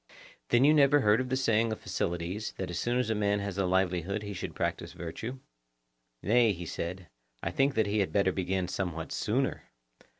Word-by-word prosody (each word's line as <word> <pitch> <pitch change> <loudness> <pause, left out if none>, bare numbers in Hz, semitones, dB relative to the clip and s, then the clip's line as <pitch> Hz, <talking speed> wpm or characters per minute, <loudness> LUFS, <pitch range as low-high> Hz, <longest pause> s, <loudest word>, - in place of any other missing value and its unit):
Then 120 +2 +4
you 150 - +6
never 145 -1 +5
heard 105 +2 +4
of 130 - -4
the 130 - +1
saying 115 -3 +2
of 110 - -4
Phocylides, 85 +5 -3
that 95 -2 -4
as 85 - -3
soon 120 +1 0
as 125 -3 0
a - - +3
man 105 -1 +1
has 100 -1 -4
a 95 - +2
livelihood 95 +2 0
he 100 0 -5
should 90 - -6
practise - - -2
virtue? 115 +10 -6 0.9
Nay, 115 +1 +4
he 85 -1 -7
said, 90 +2 -5 0.4
I 85 - -1
think 135 +7 +2
that 110 - +3
he 105 +1 0
had 100 - 0
better 100 -2 +3
begin 95 0 -1
somewhat 85 -4 -3
sooner. - - -1
100 Hz, 200 wpm, -30 LUFS, 90-115 Hz, 0.9 s, you